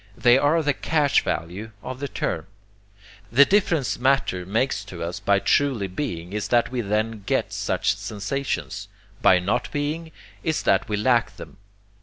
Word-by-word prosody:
They 120 0 +5
are 145 +4 +3
the 145 -1 +2
cash 145 0 +2
value 95 +7 -4
of 130 0 -6
the 140 - -3
term. - - -3 0.8
The 140 +5 +7
difference 170 - +1
matter 125 -9 +1
makes 110 0 0
to 90 -4 -7
us 85 +4 -4
by 100 0 +3
truly 125 -1 +1
being 90 - -5
is 105 -1 -2
that 120 0 +2
we 125 -1 -1
then 110 +1 -1
get - - 0
such - - 0
sensations; 100 - -4 0.3
by 95 - +6
not 95 +6 -1
being, 155 +3 -3 0.3
is 160 -2 -1
that - - +2
we 105 - 0
lack 120 +2 +2
them. - - -11
115 Hz, 160 wpm, -24 LUFS, 100-140 Hz, 0.8 s, The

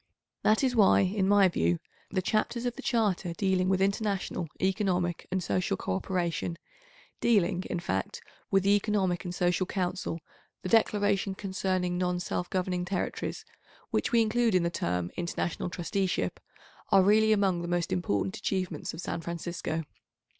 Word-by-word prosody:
That 215 +5 +3
is 255 -2 +2
why, 205 -3 +6
in 190 0 +1
my 200 -1 +6
view, 85 - +1 0.3
the 185 -2 -1
chapters 230 +4 0
of 245 -1 -1
the 270 - -7
Charter 210 -9 0
dealing 190 -1 +1
with 190 -1 +2
international, 195 -3 -1
economic 185 -2 0
and 185 -1 0
social 95 - 0
co 95 - -2
operation, 170 - -2 0.6
dealing, 185 -5 +2
in 175 - -1
fact, 95 - -2 0.3
with 195 -1 +3
the 200 +1 +5
Economic 195 -4 0
and 175 0 -4
Social 180 +1 +1
Council, 180 -3 -2 0.4
the 185 - -3
Declaration 205 -3 +2
concerning 185 -2 -1
non 180 -1 0
self 180 0 -3
governing 180 -1 -1
territories, 180 +1 -3 0.5
which - - 0
we 235 -1 +5
include 225 -1 +2
in 180 - +4
the 170 - 0
term 90 - -2
"International 175 0 -2
Trusteeship," 185 +2 -1 0.5
are 195 -2 +7
really 215 +2 +5
among 195 -4 +2
the 170 - -4
most 175 -1 -1
important 180 - -1
achievements 185 -6 -2
of 165 - -6
San 165 - -3
Francisco. 170 -1 -3
185 Hz, 155 wpm, -29 LUFS, 175-200 Hz, 0.6 s, are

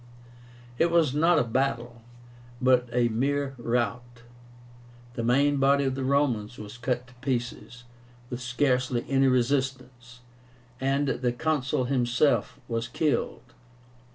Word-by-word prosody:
It 170 - +4
was 165 -5 +3
not 165 +3 +3
a - - +4
battle, 120 -1 -2 0.6
but 125 -1 +3
a 120 0 +2
mere 140 +4 -1
rout. 120 0 -2 0.9
The 120 - -4
main 140 +4 +3
body 140 +1 +3
of 135 -1 0
the 135 0 -3
Romans 130 -5 0
was 105 +2 -9
cut 125 +1 -2
to 125 - -19
pieces, 125 -1 -4 0.5
with 125 0 -4
scarcely 125 -1 0
any 135 0 +3
resistance, 125 -1 -1 0.6
and 135 +2 0
the 125 -2 0
Consul 130 0 -1
himself 125 +2 +1
was 115 -1 -2
killed. 155 -3 -2
125 Hz, 125 wpm, -27 LUFS, 120-140 Hz, 0.9 s, It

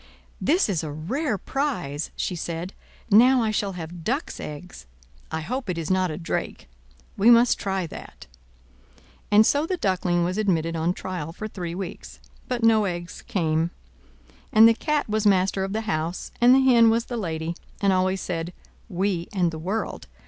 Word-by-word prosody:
"This 345 +5 +3
is 180 -6 -1
a 155 - -4
rare 215 - -2
prize!" 185 - -3
she 180 - -2
said, 170 +2 -5 0.4
"Now 245 +4 +6
I 220 - +1
shall 200 -2 -1
have 170 -1 -8
ducks' 270 - -2
eggs. 150 - -9 0.4
I 160 - -2
hope 245 - -4
it 175 - -2
is 165 +1 -3
not 185 -1 +2
a 155 - -4
drake. 165 - -4 0.5
We 210 +4 +5
must 240 +1 +5
try 195 -2 -1
that." 160 - -10 1.0
And 210 +1 +6
so 290 +6 +2
the 370 - -1
Duckling 180 - +1
was 180 +4 -1
admitted 165 -5 0
on 165 +3 0
trial 175 -4 -5
for 215 +5 -6
three 175 -5 -6
weeks; 190 -1 -7 0.3
but 245 -2 -2
no 220 -2 +5
eggs 175 -2 -5
came. 165 -7 0 0.8
And 220 +1 +8
the 230 - +6
Cat 300 +5 -1
was 215 0 +1
master 190 0 +2
of 195 - -3
the 220 +2 -1
house, 170 -5 -3
and 245 +2 +7
the 270 - +5
Hen 235 -3 +6
was 230 +1 +1
the 245 - -5
lady, 165 -5 -3 0.2
and 200 -1 +3
always 185 +1 +1
said 170 0 -4 0.4
"We 185 -2 -1
and 180 -4 +1
the 160 - -7
world!" 195 +7 -3
190 Hz, 180 wpm, -24 LUFS, 170-225 Hz, 1.0 s, And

